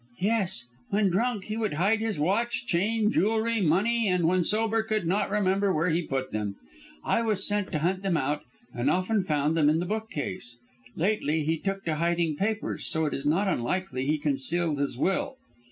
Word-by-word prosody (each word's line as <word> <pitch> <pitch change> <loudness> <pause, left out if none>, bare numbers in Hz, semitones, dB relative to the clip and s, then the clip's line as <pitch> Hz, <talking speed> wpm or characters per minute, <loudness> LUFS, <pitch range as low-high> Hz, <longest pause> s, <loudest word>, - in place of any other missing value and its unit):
"Yes! 195 - +1 0.3
When 200 -1 +2
drunk 220 +2 0
he 215 +2 -4
would 220 -5 -1
hide 195 +8 +2
his 220 -7 -2
watch, 230 +10 0
chain, 210 +3 +1
jewellery, 225 +2 +1
money, 210 +7 +2
and 180 -3 +2
when 180 +1 +3
sober 225 +3 +2
could 215 -3 -1
not 190 +5 +1
remember 200 -1 +2
where 165 +1 +1
he 165 +2 +1
put 135 -5 -3
them. 105 -2 -3 0.5
I - - +1
was 215 -4 0
set 205 -1 -1
to - - +2
hunt 180 +5 0
them 190 -4 +1
out, 145 +2 -1 0.3
and 120 +1 0
often 190 +4 +1
found 150 -3 0
them 150 -3 +4
in 155 - +3
that 175 - -1
bookcase. 145 - -3 0.4
Lately 160 -5 0
he 160 +1 0
took 195 +1 -3
to 160 -2 -1
hiding 170 -1 +1
papers, 215 +6 -2
so 160 -3 +1
it 150 - -1
is 135 +1 -3
not 180 +7 +2
unlikely 140 -2 -1
he 155 +1 +2
concealed 150 +2 0
his 140 -3 -1
will. 195 - 0
185 Hz, 190 wpm, -27 LUFS, 155-210 Hz, 0.5 s, them